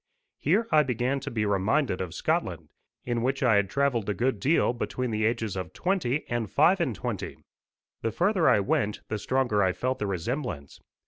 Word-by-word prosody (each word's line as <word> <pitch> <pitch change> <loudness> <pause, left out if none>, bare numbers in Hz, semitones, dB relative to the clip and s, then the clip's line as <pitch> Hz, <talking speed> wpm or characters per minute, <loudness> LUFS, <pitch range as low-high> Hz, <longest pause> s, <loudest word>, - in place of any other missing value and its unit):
Here 200 +10 +2
I 155 - +6
began 130 0 -1
to 140 - -6
be 110 -4 -1
reminded 100 +3 +1
of 90 -4 -5
Scotland, - - -1 0.4
in 120 -1 -1
which 130 +3 0
I 115 -5 +5
had 100 -1 +1
travelled 130 -6 0
a 105 - 0
good 120 +2 0
deal 135 +1 +2
between 125 0 -3
the 110 0 0
ages 115 -3 -1
of 95 -1 -5
twenty 160 -7 -1
and 120 -3 -2
five 175 +6 +4
and 130 -10 0
twenty. - - -4 0.6
The 115 - -1
further 175 - +2
I 105 - +4
went 105 +1 0
the 110 - -2
stronger 120 -2 +1
I 95 -2 +2
felt 130 +5 -2
the 105 - -1
resemblance. 95 - -4
120 Hz, 190 wpm, -27 LUFS, 105-140 Hz, 0.6 s, I